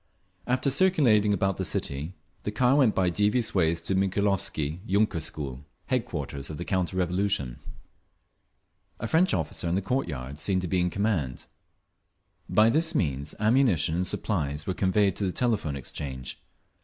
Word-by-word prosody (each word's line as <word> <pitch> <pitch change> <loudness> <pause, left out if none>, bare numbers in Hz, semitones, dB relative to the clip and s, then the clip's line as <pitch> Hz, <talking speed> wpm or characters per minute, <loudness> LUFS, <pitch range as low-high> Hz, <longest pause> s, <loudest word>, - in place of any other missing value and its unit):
After 130 +2 +1
circulating 130 - +4
about 95 -1 +1
the - - -2
city, 75 +6 -3 0.3
the - - -3
car 125 +5 +3
went 130 -7 +4
by 90 -2 +2
devious 105 +5 +1
ways 85 -3 +2
to 90 - 0
the 95 - +2
Mikhailovsky 95 -5 0
yunker 100 -4 +1
school, 70 -3 -5 0.2
headquarters 75 - -3
of 75 - -6
the 85 - -5
counter 95 -1 -1
revolution. 90 -8 -1 1.4
A - - -4
French 165 +10 +3
officer, 80 0 -1
in 85 - +1
the 95 - +1
court 130 +7 0
yard, 70 -2 -6
seemed 95 0 0
to - - -2
be 90 +2 0
in 90 - +1
command…. 90 - -1 1.0
By 110 +2 +5
this 160 +4 +2
means 70 - -1
ammunition 110 - +3
and 90 +2 0
supplies 75 -7 -2
were 95 - -1
conveyed 95 +1 +2
to - - -2
the - - -1
Telephone 105 - -1
Exchange. 65 -1 -6
95 Hz, 160 wpm, -27 LUFS, 75-105 Hz, 1.4 s, By